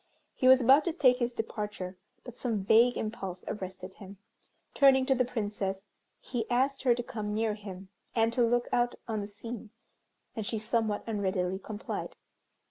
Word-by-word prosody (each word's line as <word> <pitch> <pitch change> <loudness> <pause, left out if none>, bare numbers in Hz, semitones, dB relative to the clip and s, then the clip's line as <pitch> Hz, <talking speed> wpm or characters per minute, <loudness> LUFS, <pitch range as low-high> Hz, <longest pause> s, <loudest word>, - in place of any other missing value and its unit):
He 255 - +1
was 260 0 +8
about 270 +5 +6
to 340 - 0
take 255 -7 +4
his 240 -1 -1
departure, 210 -4 -4 0.3
but 245 -2 -10
some 225 -6 -2
vague 230 +5 +5
impulse 195 -5 -5
arrested 185 -2 -6
him. 195 0 -12 0.6
Turning 265 -2 +5
to 265 - +3
the 255 -1 +2
Princess, 205 -5 -3 0.3
he 235 -3 -4
asked 265 +3 +1
her 245 -3 +4
to 240 - -3
come 210 -3 -4
near 220 0 +1
him, 195 -2 -9 0.3
and 225 0 +2
to 245 - +1
look 240 +1 +2
out 240 0 +2
on 220 -2 -2
the 200 - -5
scene, 225 +2 -8 0.7
and 220 - -3
she 220 +2 -2
somewhat 220 -1 -1
unreadily 190 -4 -1
complied. 210 +1 -5
225 Hz, 170 wpm, -30 LUFS, 205-245 Hz, 0.7 s, was